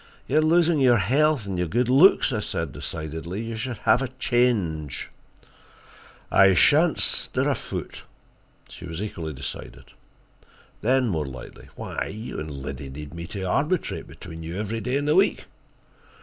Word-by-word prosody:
"You 155 - +2
are - - +4
losing 165 0 +3
your 125 -3 +5
health 140 - +2
and 95 -3 -3
your 90 - 0
good 120 +8 +1
looks," 135 +1 +5
I 110 - 0
said 85 -7 -3
decidedly. 80 +8 -5
"You 115 0 -5
should 120 +1 -4
have 125 - +5
a 135 - -1
change." 120 - 0 1.2
"I 95 -1 +6
shan't 155 - +5
stir - - +1
a - - +3
foot." - - -6 0.7
She - - -10
was 85 -1 -6
equally 85 -7 -5
decided. 70 0 -8 0.9
Then, 130 +2 +2
more 80 -8 -1
lightly: 65 -1 -10
"Why, - - -4
you 110 +4 -6
and 75 - -5
Liddy 70 -1 -6
need 75 +3 -8
me 85 0 -7
to 100 +1 -5
arbitrate 150 - -1
between 80 -1 -10
you 80 +3 -6
every 110 +2 -3
day 125 +3 -1
in 145 - -2
the 150 - +3
week." 190 +4 +3
105 Hz, 165 wpm, -25 LUFS, 80-130 Hz, 1.2 s, I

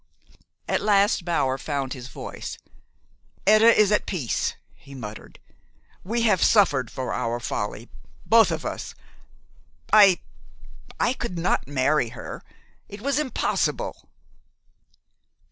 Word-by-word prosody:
At - - 0
last 200 -3 +2
Bower 135 -6 0
found 140 -2 -3
his 125 -2 -8
voice. 120 - -7 0.9
"Etta 215 +3 +6
is 215 -2 +4
at 210 - +1
peace," 150 - -2 0.2
he 140 - -15
muttered. 110 -4 -9 0.7
"We 230 +5 -1
have 210 -6 +3
suffered 145 - +3
for 130 -1 -4
our 115 +1 -2
folly 110 -1 -4 0.4
both 225 0 +5
of - - -4
us. - - -5 1.0
I 200 -4 +7 0.8
I 245 - +2
could 235 -8 -5
not 170 -4 0
marry 145 -2 +1
her. - - -8 0.5
It 205 +1 -10
was 280 +3 0
impossible." 300 - -2
175 Hz, 115 wpm, -24 LUFS, 130-215 Hz, 1.0 s, I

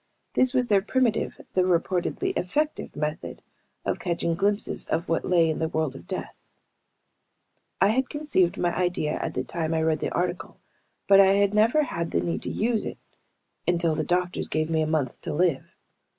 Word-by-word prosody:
This 255 -1 +4
was 250 -1 +2
their 200 -3 +4
primitive, 235 +1 0
though 185 -1 +3
reportedly 180 0 0
effective 300 +12 -2
method 150 +1 -4 0.4
of - - -1
catching 170 -1 -1
glimpses 200 +4 0
of 165 +3 -2
what 165 - 0
lay 170 -2 +4
in 160 - -1
the 160 - 0
world 155 -4 -1
of - - -12
death. - - -5 1.5
I 195 - +5
had 255 +4 +1
conceived 295 - +1
my 175 -1 0
idea 175 -4 0
at - - -4
the - - -1
time 165 -1 -2
I 160 - +1
read 160 -1 +1
the - - -2
article, 180 0 -3 0.5
but 195 0 +7
I 195 0 +5
had 200 0 +2
never 230 +9 +4
had 170 - -3
the 85 - 0
need 85 -2 -2
to - - -4
use 225 0 0
it - - -5 0.7
until 170 -2 +2
the 155 0 -1
doctors 180 +2 -1
gave 155 +1 -1
me 160 -1 +2
a 155 - 0
month 150 -5 -1
to - - -4
live. 170 -4 +1
175 Hz, 185 wpm, -26 LUFS, 160-205 Hz, 1.5 s, but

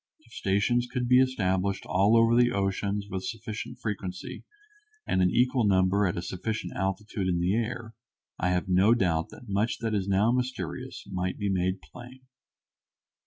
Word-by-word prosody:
If - - -21
stations 115 +6 +1
could 125 -2 -1
be 125 +1 +6
established 100 -6 0
all 100 +5 +3
over 115 +1 +5
the 120 0 +4
oceans 100 0 -1
with 95 -2 -4
sufficient 110 +1 -6
frequency, 95 -4 -5 0.6
and 95 - +1
an 90 - +4
equal 125 +3 +2
number 95 0 +3
at 85 - -2
a 85 - -3
sufficient 110 +5 -4
altitude 95 +1 -2
in 90 -1 +1
the 90 +3 +1
air, 115 0 -3 0.5
I 90 - +1
have 90 +1 0
no 95 +5 +4
doubt 85 -7 0
that 125 - -13
much 100 +3 0
that 115 -2 -2
is 100 -2 -1
now 100 +4 +3
mysterious 125 +1 -3
might 90 0 -2
be 100 - -1
made 95 0 -1
plain. 125 +2 -12
100 Hz, 165 wpm, -28 LUFS, 95-115 Hz, 0.6 s, be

